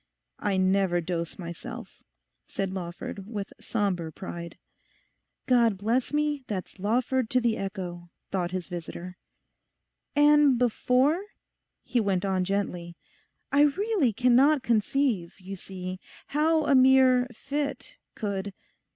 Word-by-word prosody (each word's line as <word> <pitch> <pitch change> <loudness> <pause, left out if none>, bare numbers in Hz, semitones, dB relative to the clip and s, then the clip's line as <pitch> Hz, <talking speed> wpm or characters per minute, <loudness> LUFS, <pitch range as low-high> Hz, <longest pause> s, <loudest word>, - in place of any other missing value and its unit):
'I 200 -2 0
never 185 -1 +2
dose 170 -1 -3
myself,' 170 -2 -8 0.5
said 195 -1 -3
Lawford, 185 +2 -6
with 210 -3 -5
sombre 185 -7 -1
pride. 170 -2 -7 0.9
'God 235 -5 +3
bless 230 +6 0
me, 295 -1 0
that's 195 -1 -5
Lawford 245 +4 0
to 255 - +3
the 235 -2 +1
echo,' 180 -3 -5 0.2
thought 180 -3 -1
his 185 -1 -4
visitor. 180 +1 -7 1.0
'And 295 -2 +6
before—?' 250 - +2 0.6
he 245 - 0
went 200 -3 0
on 190 -1 +1
gently; 180 -3 -3 0.5
'I 280 +1 +4 0.2
really 400 - +2
cannot 255 +6 +4
conceive, 225 -5 0
you 195 +1 -7
see, 185 0 -7 0.3
how 310 +1 +2
a 285 - +3
mere 260 -1 +6
fit 280 +4 -4 0.2
could... 200 -2 -3
205 Hz, 115 wpm, -27 LUFS, 185-260 Hz, 1.0 s, And